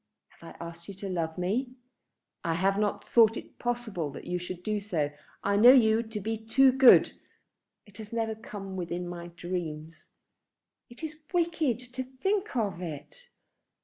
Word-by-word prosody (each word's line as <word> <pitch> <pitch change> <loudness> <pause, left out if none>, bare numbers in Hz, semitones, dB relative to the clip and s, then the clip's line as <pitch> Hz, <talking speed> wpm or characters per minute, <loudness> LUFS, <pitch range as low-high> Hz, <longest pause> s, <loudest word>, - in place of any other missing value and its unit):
Have - - -13
I - - -6
asked 170 0 -10
you 200 - -8
to 195 +1 -6
love 165 -2 -2
me? 235 +8 -1 0.7
I 165 -1 0
have 195 +3 +1
not 210 -1 -1
thought 225 -1 +5
it - - -11
possible 235 -10 -2
that - - -9
you 180 0 -2
should 180 0 -7
do 215 +1 -1
so. 170 -8 -1 0.3
I 200 0 +2
know 240 +5 +9
you 225 -3 +5
to 220 -2 -6
be 220 +2 -3
too 265 +4 +5
good. 260 -1 +7 0.7
It 205 0 -12
has 215 -1 -9
never 225 -1 -1
come 200 -3 -8
within 175 0 -4
my 175 -1 -7
dreams." 170 -3 -6 0.8
"It 240 +5 -12
is 310 -1 -6
wicked 330 - +1 0.2
to 260 - -2
think 380 +11 -2
of 205 -7 -1
it." 180 - -8
210 Hz, 170 wpm, -29 LUFS, 175-240 Hz, 0.8 s, know